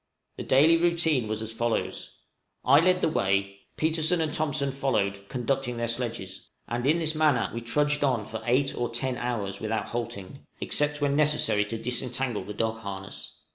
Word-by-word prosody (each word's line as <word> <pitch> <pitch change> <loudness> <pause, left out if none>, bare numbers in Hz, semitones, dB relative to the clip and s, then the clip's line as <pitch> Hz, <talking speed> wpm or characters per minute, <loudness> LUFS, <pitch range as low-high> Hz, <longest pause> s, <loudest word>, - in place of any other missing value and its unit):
The - - -5
daily 155 +5 +5
routine 165 -7 +1
was 110 +1 -3
as 110 0 -5
follows: 115 0 -2 0.5
I 140 +3 +7
led 180 +2 +3
the - - +3
way; 100 -7 0 0.2
Petersen 160 +2 +2
and 155 -2 -1
Thompson 150 -3 0
followed, 100 -8 -1
conducting 125 -1 -1
their 115 0 -1
sledges; 115 -6 -4 0.2
and 120 +2 -2
in 155 +3 +4
this 160 -2 -1
manner 155 -6 +2
we 115 - -4
trudged 145 +5 +1
on 125 -7 +1
for 110 +1 -6
eight 135 +3 +2
or 120 - -1
ten 125 +2 -2
hours 105 -6 -3
without 110 0 -2
halting, 115 0 -6
except 150 0 +1
when 140 -1 +2
necessary 140 -9 +3
to 115 +2 -3
disentangle 125 -1 -2
the 105 +2 -7
dog 110 +1 -1
harness. 100 -2 -8
125 Hz, 175 wpm, -27 LUFS, 110-145 Hz, 0.5 s, I